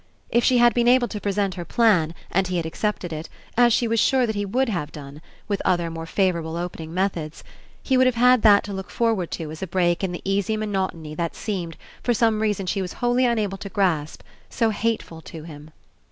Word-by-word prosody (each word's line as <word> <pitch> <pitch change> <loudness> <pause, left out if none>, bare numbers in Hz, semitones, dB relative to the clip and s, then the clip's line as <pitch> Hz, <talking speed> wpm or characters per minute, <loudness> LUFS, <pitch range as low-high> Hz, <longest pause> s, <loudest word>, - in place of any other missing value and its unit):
If 235 - +3
she 255 - +4
had 240 -1 +5
been 240 +1 +2
able 245 0 +5
to 210 - -5
present 200 -1 0
her 175 - -6
plan, 180 -5 +2 0.2
and 190 +1 +1
he 180 -1 -1
had 165 - -1
ac 160 - -5
cepted 180 -5 -3
it, 155 +1 -6 0.3
as 240 0 +5
she 235 +1 +2
was 225 0 +1
sure 260 +2 +3
that 220 - -2
he 205 0 -1
would 255 +7 0
have 170 -9 -3
done, 145 0 -10 0.3
with 200 -2 -1
other 175 -2 +1
more 165 0 -6
favourable 170 -3 0
opening 170 -2 -5
methods, 170 -4 -2 0.4
he 265 - +2
would 255 0 +5
have 255 - +1
had 250 0 +5
that 205 -2 +6
to 205 - -6
look 190 0 -6
for 230 -1 +1
ward 180 -6 -3
to 160 -3 -5
as 155 - -9
a 190 - -3
break 175 0 +1
in 190 - 0
the 175 - -6
easy 200 +2 0
monotony 190 -7 -3
that 170 +1 -3
seemed, 175 -6 -4 0.2
for 240 - +1
some 220 -1 +2
reason 210 -3 0
she 195 +2 -1
was 185 -1 -4
wholly 245 +1 +2
un 235 -1 +1
able 200 -3 -2
to 200 - -7
grasp, 175 -7 -1 0.3
so 225 -2 +1
hateful 215 -7 -2
to 160 -1 -10
him. 150 -2 -11
195 Hz, 235 wpm, -23 LUFS, 170-225 Hz, 0.4 s, that